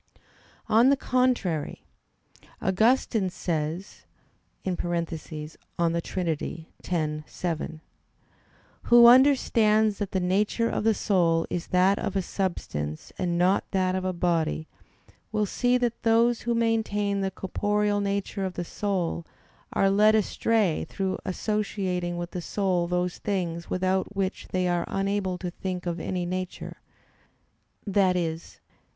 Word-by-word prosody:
On 230 +4 +5
the 280 - +4
contrary, 250 - 0 0.8
Augustine 220 0 +2
says 165 +1 -4 0.6
(De 185 -2 -1
Trin. 165 0 -3 0.2
x, 155 -3 -2
7): 160 -2 -4 1.0
"Who 240 0 +8
understands 225 -5 +5
that 205 -2 -3
the 190 - 0
nature 205 +5 +1
of - - -1
the 225 -1 +3
soul 170 -5 +2
is 175 - -3
that 185 +2 +3
of 200 - -3
a 195 - +1
substance 75 - -4
and 175 -2 0
not 185 +3 +2
that 185 -1 +1
of 185 0 -1
a 185 - 0
body, 165 -3 0 0.6
will 215 -1 +1
see 245 +5 +1
that 240 -2 -1
those 230 +1 +3
who 235 0 -1
maintain 210 -3 0
the 195 - 0
corporeal 205 +2 0
nature 200 0 -2
of 185 -1 -3
the 175 - -3
soul, 185 -4 -2 0.5
are 195 0 +2
led 210 +2 +5
astray 215 -3 +1
through 190 -1 -2
associating 185 -3 -2
with 175 0 -5
the 180 - -4
soul 180 -2 0
those 180 0 -1
things 175 -4 -3
without 190 +2 0
which 195 -1 -2
they 185 -1 0
are 175 -1 0
unable 195 -1 -1
to 180 -1 -5
think 180 0 -5
of 170 -1 -2
any 180 0 -2
nature 185 +1 -5 1.2
i.e. 180 -5 +2
185 Hz, 125 wpm, -26 LUFS, 175-210 Hz, 1.2 s, Who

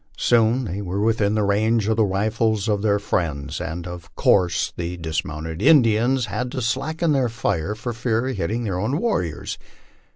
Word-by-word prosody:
Soon 120 +2 +3
they 100 0 -4
were 95 0 -3
within 105 -1 +1
the 105 - +1
range 105 +2 +2
of 110 - +2
the 110 - +3
rifles 110 +2 0
of 105 -2 +1
their 105 -1 +2
friends, 80 -7 -2
and 85 +1 -5
of 90 -2 -9
course 90 -3 +2
the 85 +1 -4
dismounted 80 0 -4
Indians 125 -2 +4
had 125 +1 -3
to 130 - -2
slacken 155 +8 0
their 135 -4 +2
fire 100 -4 -2
for 120 +2 -5
fear 115 +1 -1
of 130 - -3
hitting 105 +6 -2
their 95 -5 -2
own 125 +9 0
war 230 +4 +1
riors. 85 -4 -5
105 Hz, 185 wpm, -22 LUFS, 90-120 Hz, -, Indians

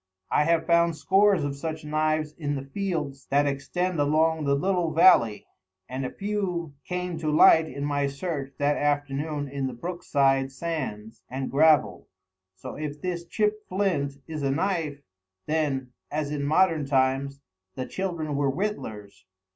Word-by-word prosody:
I 150 - +3
have 165 0 +2
found 170 -1 +3
scores 195 +2 +3
of 140 -1 -2
such 155 +2 -5
knives 155 0 0
in 145 -3 -3
the 135 - -4
fields 150 -3 -4
that 145 +1 +3
extend 155 +5 -1
along 155 +2 +2
the 140 0 +3
little 175 +1 0
valley, 115 - +5 0.4
and 130 +1 -4
a 130 - -2
few 190 -6 -3
came 180 -2 -3
to 155 -1 -1
light 160 +1 +6
in 140 0 -5
my 145 -1 0
search 140 -2 -4
that 145 +1 +1
afternoon 145 0 -1
in 135 -1 -3
the 130 - -5
brook 175 +7 -5
side 135 -1 +2
sands 130 -8 -5
and 130 +1 -4
gravel. 155 +2 +3 0.5
So, 95 - -8
if 150 -1 -5
this 175 -1 -3
chipped 210 +3 -1
flint 185 -8 0
is 155 -2 -5
a 140 - 0
knife, 155 -2 -1 0.4
then, 140 -5 -1 0.2
as 150 -1 -2
in 145 -1 -2
modern 160 -1 +3
times, 135 0 +1 0.4
the 130 - -3
children 170 -5 -3
were 140 -1 +1
whittlers. 135 - -4
150 Hz, 155 wpm, -26 LUFS, 140-170 Hz, 0.5 s, light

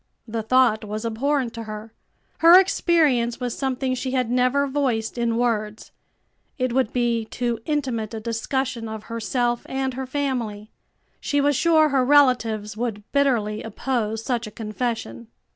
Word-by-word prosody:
The 225 0 -3
thought 230 -1 +3
was 215 +2 -5
abhorrent 250 +2 0
to 230 -1 -7
her. 215 +1 -8 0.5
Her 340 +3 +9
experience 305 -11 +2
was 245 -2 -3
something 265 -1 -1
she 255 +1 -3
had 250 -3 0
never 255 +3 +2
voiced 265 -6 -1
in 235 -1 0
words. 215 -3 -1 0.7
It 255 -3 -1
would 260 -3 +1
be 235 -2 0
too 240 0 -2
intimate 255 -8 -2
a - - -4
discussion 230 +1 -2
of 220 -1 -6
herself 240 +1 -1
and 265 0 -2
her 260 +1 -5
family. 245 -7 -3 0.5
She 285 - 0
was 285 0 +2
sure 315 +1 +4
her 270 -2 +2
relatives 245 -7 +3
would 220 -2 -3
bitterly 235 -7 +1
oppose 225 -1 -2
such 240 -3 -2
a - - -9
confession. 215 - -4
240 Hz, 150 wpm, -23 LUFS, 220-265 Hz, 0.7 s, Her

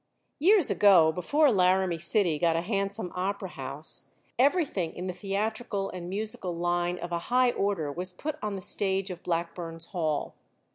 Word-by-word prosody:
Years 370 +1 +4
ago, 180 -6 +6
before 285 - +2
Laramie 185 -3 +2
City 170 -2 +1
got 165 0 +2
a 165 - +1
handsome 195 0 -2
opera 190 +1 -3
house, 140 +1 -2 0.2
everything 270 - +1
in 180 - -5
the 185 - -3
theatrical 200 +1 -3
and 175 -1 -7
musical 195 -3 -4
line 175 +1 0
of 175 0 -6
a 170 - 0
high 250 0 +4
order 195 -10 -1
was 180 +4 -3
put 295 +11 -5
on 210 -1 -3
the 190 - -6
stage 195 0 +1
of 180 - -8
Blackburn's 165 -1 -3
Hall. 155 -5 -1
185 Hz, 160 wpm, -28 LUFS, 170-205 Hz, 0.2 s, ago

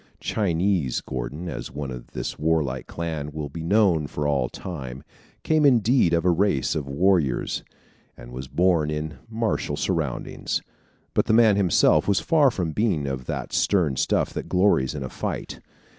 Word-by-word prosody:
"Chinese" 90 - 0
Gordon, 65 +7 -5
as - - -5
one 70 0 -5
of 60 -1 -8
this - - -4
warlike 75 -5 0
clan 80 -3 -4
will 75 -1 -5
be 80 +4 -7
known 85 -4 +3
for 75 0 -3
all 70 -4 +1
time, 70 -7 -7 0.4
came 155 -1 +2
indeed 120 -7 +4
of 85 0 +1
a 90 - +5
race 85 -7 +1
of 75 -3 -3
warriors, 80 -3 +1 0.5
and - - -11
was 65 +2 -7
born 85 -1 +2
in 75 -2 -4
martial 115 -1 -1
surroundings; - - -2 0.5
but - - +2
the - - +3
man 110 -2 +6
himself 95 -4 +3
was 100 -2 +3
far 155 -4 +4
from 90 -9 -2
being 95 -6 0
of 65 -2 -4
that - - -4
stern 85 -9 +2
stuff - - 0
that - - -5
glories 90 -8 +2
in 70 - -4
a 65 - -5
fight. - - -5
80 Hz, 165 wpm, -24 LUFS, 70-100 Hz, 0.5 s, man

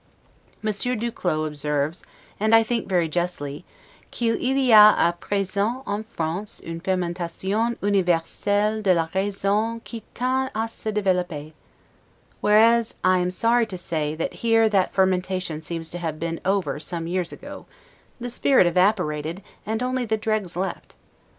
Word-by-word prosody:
Monsieur 215 +4 -1
du 235 +1 -2
Clos 155 -7 -1
observes, 150 +2 -2 0.4
and 215 +2 +4
I 225 - +6
think 230 -2 -2
very 175 -3 +2
justly, 160 -3 -3 0.5
'qu'il 230 -2 -1
y 265 0 +2
a 215 -1 +9
a 170 - +3
present 200 +6 -1
en 205 +1 -2
France 180 0 -4
une 165 0 -5
fermentation 185 +5 -1
universelle 205 +3 +1
de 190 -3 +3
la 165 -1 0
raison 205 +3 0
qui 230 -2 -8
tend 260 +2 0
a 225 +1 0
se 220 -1 -5
developper'. 180 -7 -1 0.9
Whereas, 225 +2 +4
I 185 0 +4
am 180 0 0
sorry 230 +5 +2
to 190 - -6
say, 155 -3 -2
that 165 - -3
here 225 -1 +4
that 195 -3 +2
fermentation 185 -3 0
seems 165 0 -5
to 175 - -5
have 160 -3 -4
been 165 0 -3
over 185 -7 0
some 165 +2 -5
years 175 0 -2
ago, - - -10 0.5
the 245 0 -5
spirit 260 -3 +4
evaporated, 175 -2 +1 0.2
and 220 +3 -1
only 255 0 -1
the 220 -1 0
dregs 215 -4 -2
left. 190 +1 -4
190 Hz, 150 wpm, -24 LUFS, 170-220 Hz, 0.9 s, a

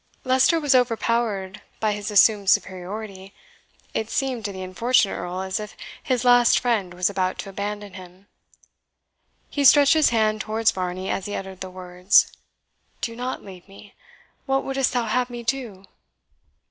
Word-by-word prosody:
Leicester 260 +6 +3
was 290 -3 +2
overpowered 230 -5 0 0.2
by 215 -1 +1
his 205 +1 -5
assumed 205 -1 +4
superiority 190 +1 -2 0.6
it 220 - -2
seemed 260 -4 -2
to 205 - -3
the 190 -1 -7
unfortunate 210 +4 +1
Earl 180 +1 -5
as 190 +1 -3
if 210 0 -8 0.2
his 255 -4 -1
last 245 -1 +5
friend 220 -7 -1
was 180 +1 +1
about 185 -2 -1
to 195 - -7
abandon 205 0 -5
him. 185 0 -13 1.3
He 285 - -1
stretched 280 +2 +7
his 315 -2 +4
hand 215 -2 +1
towards 220 +1 +1
Varney 185 0 -4
as 195 - -3
he 205 - -4
uttered 190 -1 -7
the 190 - -5
words, 180 +1 +2 0.7
"Do 230 - -4
not 250 +2 -5
leave 185 -2 -12
me. 200 +1 -15 0.5
What 270 0 +1
wouldst 270 -1 0
thou 245 -2 -1
have 250 +3 0
me 240 -1 -7
do?" 225 -6 -4
210 Hz, 160 wpm, -23 LUFS, 190-245 Hz, 1.3 s, stretched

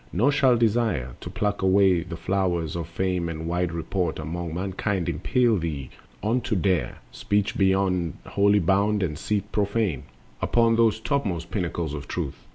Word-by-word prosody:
Nor 120 +11 +3
shall 130 -4 +4
desire 110 - +1
To - - -6
pluck 105 +1 -1
the 95 -3 +3
flowers 85 -3 -1
of 85 -1 -3
fame 90 0 -1
and 80 0 -5
wide 90 0 -1
report 85 +1 -2
Among 80 +2 -4
mankind 95 0 -2
impel 120 -4 +2
thee 75 -7 -4 0.3
on 115 +4 +1
to 110 - -1
dare 90 -1 0
Speech 105 +1 -1
beyond 95 -4 +1
holy 100 +1 +3
bound 100 +3 +2
and 80 -5 -2
seat 105 +5 -2
profane 100 - 0 0.4
Upon 115 -1 +3
those 115 -1 +3
topmost 100 - -2
pinnacles 85 -5 -2
of 75 -1 -6
Truth. - - -5
95 Hz, 155 wpm, -25 LUFS, 85-105 Hz, 0.4 s, shall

